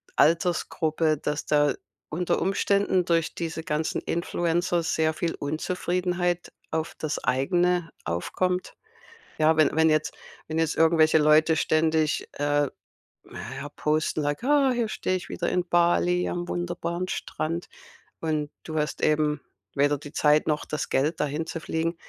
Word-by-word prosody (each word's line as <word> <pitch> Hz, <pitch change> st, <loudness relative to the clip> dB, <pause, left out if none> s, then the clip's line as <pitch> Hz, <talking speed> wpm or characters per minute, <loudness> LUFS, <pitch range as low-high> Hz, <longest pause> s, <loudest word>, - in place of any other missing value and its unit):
Altersgruppe, 160 Hz, -1 st, +2 dB
dass 150 Hz, +1 st, -3 dB
da 145 Hz, -2 st, +3 dB, 0.4 s
unter 175 Hz, +3 st, -1 dB
Umständen 195 Hz, -1 st, +2 dB
durch 165 Hz, -1 st, +1 dB
diese 165 Hz, -1 st, -4 dB
ganzen 155 Hz, +1 st, -1 dB
Influencer 175 Hz, +1 st, 0 dB
sehr 160 Hz, -1 st, +1 dB
viel 165 Hz, +1 st, -2 dB
Unzufriedenheit 175 Hz, +3 st, -1 dB, 0.2 s
auf 160 Hz, 0 st, -2 dB
das 155 Hz, -, -3 dB
Eigene 175 Hz, +5 st, +1 dB
aufkommt? 180 Hz, -, -2 dB, 0.6 s
Ja, 155 Hz, 0 st, +3 dB
wenn 155 Hz, -1 st, +4 dB
wenn 160 Hz, 0 st, +4 dB
jetzt 155 Hz, 0 st, +1 dB, 0.3 s
wenn 160 Hz, +1 st, -2 dB
jetzt 160 Hz, -1 st, +1 dB
irgendwelche 160 Hz, -1 st, +5 dB
Leute 155 Hz, +1 st, +5 dB
ständig, 155 Hz, -1 st, +1 dB
äh, 145 Hz, 0 st, +1 dB, 0.6 s
naja, 145 Hz, +1 st, -7 dB
posten, 155 Hz, +1 st, 0 dB
sag: 145 Hz, +9 st, -2 dB
„Ah, 280 Hz, 0 st, +4 dB
hier 240 Hz, -2 st, 0 dB
steh 185 Hz, -, -1 dB
ich 180 Hz, -, -5 dB
wieder 175 Hz, -, -2 dB
in 180 Hz, -1 st, 0 dB
Bali 175 Hz, +1 st, +2 dB
am 175 Hz, 0 st, -3 dB
wunderbaren 175 Hz, 0 st, -3 dB
Strand“ 165 Hz, 0 st, -3 dB, 0.5 s
und 155 Hz, -2 st, -1 dB
du 160 Hz, -1 st, -5 dB
hast 150 Hz, -, -2 dB
eben 150 Hz, -1 st, +2 dB, 0.3 s
weder 145 Hz, +1 st, +3 dB
die 145 Hz, +1 st, -11 dB
Zeit 150 Hz, 0 st, +3 dB
noch 150 Hz, -1 st, 0 dB
das 150 Hz, -2 st, -3 dB
Geld, 150 Hz, +5 st, +1 dB
dahin 150 Hz, +2 st, -1 dB
zu 165 Hz, 0 st, -5 dB
fliegen. 165 Hz, +1 st, -2 dB
160 Hz, 140 wpm, -26 LUFS, 150-175 Hz, 0.6 s, irgendwelche